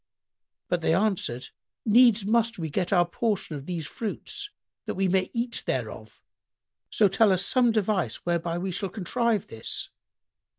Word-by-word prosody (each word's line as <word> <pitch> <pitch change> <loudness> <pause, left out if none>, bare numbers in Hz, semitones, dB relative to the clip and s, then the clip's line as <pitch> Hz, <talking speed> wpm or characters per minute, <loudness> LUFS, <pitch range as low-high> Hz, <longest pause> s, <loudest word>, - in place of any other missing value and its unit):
But 175 - 0
they 160 - +2
answered, 185 - 0 0.4
"Needs 230 -2 +5
must 230 +1 +2
we 160 -3 -4
get 180 +4 -1
our 175 -3 +4
portion 195 -2 -2
of 140 -1 -8
these 170 -3 -3
fruits 320 - -5 0.4
that - - -3
we 190 0 +1
may 185 0 +1
eat 235 +1 -2
thereof: - - -4 0.7
so 210 - +4
tell 210 +2 +4
us 185 +1 +2
some 245 -2 +4
device 200 - 0
whereby 170 -1 -1
we 185 +2 -3
shall 190 +2 -3
contrive 220 +2 0
this." 110 - -3
195 Hz, 155 wpm, -26 LUFS, 175-225 Hz, 0.7 s, Needs